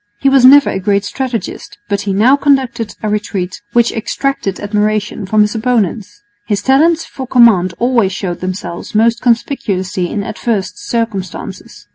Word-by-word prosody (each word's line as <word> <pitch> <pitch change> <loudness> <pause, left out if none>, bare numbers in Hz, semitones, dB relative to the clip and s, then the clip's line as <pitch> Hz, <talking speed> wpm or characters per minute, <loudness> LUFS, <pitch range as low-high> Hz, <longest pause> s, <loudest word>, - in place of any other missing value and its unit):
He 275 - +3
was 270 -2 +4
never 280 +2 +7
a 190 - -3
great 200 +1 0
strategist, 255 -1 -5
but 200 -1 -1
he - - +1
now 230 +8 +4
conducted 265 -6 0
a - - -1
retreat 200 -3 -3
which 235 0 +3
extracted 225 -3 -3
admiration 210 0 -1
from 215 +2 +3
his 210 0 +2
opponents. 220 -2 -2 0.2
His 205 -2 -1
talents 315 +5 +3
for 260 -1 -8
command 210 -9 +4
always 235 -3 +1
showed 185 -2 -4
themselves 185 0 -6
most 230 +2 +2
conspicuously 195 -7 -1
in 205 - -3
adverse 200 -3 -2
circumstances. 205 -3 -5
215 Hz, 150 wpm, -14 LUFS, 195-245 Hz, 0.2 s, never